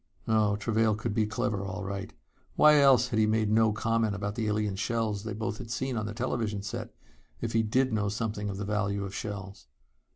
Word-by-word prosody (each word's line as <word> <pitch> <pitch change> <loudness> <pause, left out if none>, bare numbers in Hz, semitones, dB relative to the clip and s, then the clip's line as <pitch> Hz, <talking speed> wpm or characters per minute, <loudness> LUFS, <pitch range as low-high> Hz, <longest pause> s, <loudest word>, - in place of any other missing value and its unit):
Oh, 110 -2 +3
Travail 110 +1 +1
could 110 -1 -3
be 110 0 +1
clever 105 -2 -1
all 100 +1 -5
right! 100 +1 -5 0.4
Why 150 -1 +7
else 130 -3 +5
had 110 - 0
he 110 - +4
made 110 -1 +1
no 110 0 +4
comment 115 -1 0
about 100 0 -3
the 110 0 -2
alien 105 -1 0
shells 110 -1 -1
they 110 - -3
both 110 0 -3
had 120 - -8
seen 130 +2 -2
on 110 -2 -2
the 105 - -5
television 110 -4 -2
set, 100 - -6 0.4
if 115 -1 -3
he 115 - +4
did 125 +3 +1
know 105 -2 +1
something 105 -1 -3
of 95 - -4
the 105 - -3
value 100 -1 -1
of 95 - -7
shells? 100 - -6
110 Hz, 215 wpm, -29 LUFS, 105-115 Hz, 0.4 s, Why